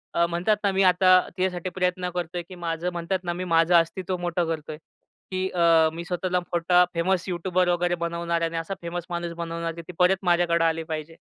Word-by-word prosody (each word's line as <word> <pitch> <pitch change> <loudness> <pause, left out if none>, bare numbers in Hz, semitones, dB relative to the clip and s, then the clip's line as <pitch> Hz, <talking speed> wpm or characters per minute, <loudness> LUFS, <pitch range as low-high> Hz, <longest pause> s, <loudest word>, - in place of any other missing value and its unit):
अ, 170 - +4
म्हणतात 175 +5 +1
ना, 200 - +2
मी 195 +1 +2
आता 185 0 +6
तिच्यासाठी 185 0 -2
प्रयत्न 180 -1 0
करतोय, 175 0 -3
की 185 - -9
माझं, 170 0 -3
म्हणतात 175 +2 -2
ना, 175 - -2
मी 180 +1 -4
माझं 165 0 +3
अस्तित्व 180 +2 +1
मोठं 175 0 -1
करतोय, 155 -1 -4 0.5
की 185 0 -1
अ, 165 -2 +4
मी 170 +1 -6
स्वतःला 180 0 -1
मोठा 175 0 +2
फेमस 180 +2 0
यूट्यूबर 180 0 0
वगैरे 175 0 +1
बनवणार 170 0 -2
आहे 165 - +1
आणि 165 - -5
असा 165 +4 -3
फेमस 170 0 -4
माणूस 170 -1 -3
बनवणार, 165 0 -4
की 170 - -7
ती 180 - -8
परत 180 +1 +4
माझ्याकडं 175 -1 +2
आली 165 0 0
पाहिजे. 160 0 -6
175 Hz, 200 wpm, -25 LUFS, 170-180 Hz, 0.5 s, आता